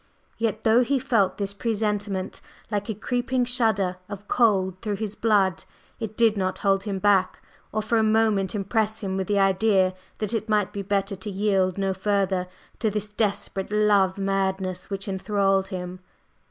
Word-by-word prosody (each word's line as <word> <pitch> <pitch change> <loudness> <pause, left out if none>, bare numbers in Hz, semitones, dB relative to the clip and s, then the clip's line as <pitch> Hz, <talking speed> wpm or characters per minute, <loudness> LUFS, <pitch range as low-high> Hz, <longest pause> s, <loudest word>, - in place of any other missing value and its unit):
Yet, 225 -3 -1
though 225 +3 +5
he 275 +3 +1
felt 230 -8 +1
this 200 -1 -2
presentiment 205 -3 -2 0.3
like 205 +1 -2
a 220 - -2
creeping 245 +3 -1
shudder 220 -7 +1
of 205 0 -8
cold 190 -6 +2
through 210 -2 -2
his 210 0 -4
blood, 205 -5 +2 0.4
it 220 -1 -5
did 225 -2 +4
not 185 -2 -1
hold 195 0 +1
him 200 -2 -2
back, 190 -1 +2 0.3
or 215 - -1
for 225 +1 +1
a - - +3
moment 215 -3 +2
impress 215 +2 0
him 190 -2 -2
with 190 -1 -2
the 205 - +1
idea 195 -1 +3 0.2
that 215 +1 -2
it 220 -1 -2
might 210 -2 +1
be 200 - -3
better 195 0 -1
to 210 +3 -5
yield 195 -2 +1
no 195 -1 0
further 190 -1 0 0.3
to 220 - +1
this 210 0 -3
desperate 205 -2 -2
love 205 -3 +3
madness 190 -2 -1
which 195 0 -4
enthralled 195 0 +1
him. 185 -1 -6
200 Hz, 170 wpm, -25 LUFS, 190-215 Hz, 0.4 s, though